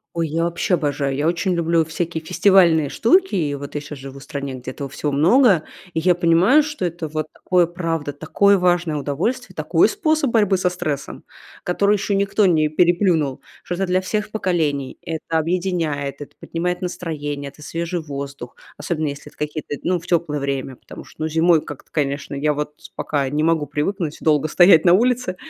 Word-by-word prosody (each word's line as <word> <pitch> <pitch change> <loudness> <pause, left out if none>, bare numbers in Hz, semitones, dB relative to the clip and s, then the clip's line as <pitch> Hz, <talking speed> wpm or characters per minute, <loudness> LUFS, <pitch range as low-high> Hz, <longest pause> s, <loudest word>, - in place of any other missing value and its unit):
Ой, 165 -1 0
я 165 +2 0
вообще 175 +2 -1
обожаю, 145 -4 0
я 145 +3 0
очень 175 +2 0
люблю 165 -1 +1
всякие 160 0 -4
фестивальные 175 -4 +4
штуки, 365 - +3
и 150 -5 0
вот 140 +1 -8
я 145 - -2
щас 150 -1 -9
живу 135 0 -9
в 135 - -12
стране, 140 -2 -5
где 130 0 -7
этого 140 +1 -6
всего 145 +2 -3
много. 180 - +4 0.3
И 160 - 0
я 180 +2 +3
понимаю, 175 - +4
что 300 -10 -4
это 170 -1 -4
вот 155 0 -3
такое, 180 -2 +2
правда, 165 -4 -3
такое 200 +7 +3
важное 175 -3 +1
удовольствие, 145 - -2
такой - - +3
способ 310 - 0
борьбы 205 -4 +3
со 180 0 +1
стрессом, 155 -6 -4 0.4
который 200 +3 +2
ещё 200 +1 -1
никто 200 +1 +2
не 155 -3 +3
переплюнул, 170 -4 +2 0.2
что 175 - -4
это 195 +2 -1
для 185 +1 +1
всех 210 +3 -3
поколений. 155 -10 -1
Это 160 0 -3
объединяет, 160 -5 -1
это 145 - -10
поднимает 180 +2 -3
настроение, 150 -6 -4
это 150 - -18
свежий 170 +4 -3
воздух, 140 -4 -7 0.2
особенно 155 +1 -2
если 145 +1 -7
это - - -27
какие-то, 150 0 -4
ну, 180 -1 +1
в 170 - -15
тёплое 165 -4 0
время, 135 -1 -3
потому - - -11
что, - - -15
ну, 155 - 0
зимой 165 0 +3
как-то, 145 - -11
конечно, 140 -1 -2
я 150 +2 0
вот 150 0 -4 0.2
пока 140 -3 -1
не 150 +3 -1
могу 160 -2 +1
привыкнуть 155 +3 -2
долго 155 -1 +2
стоять 175 +1 +6
на 175 - +7
улице. 245 -1 +2
165 Hz, 185 wpm, -21 LUFS, 145-180 Hz, 0.4 s, на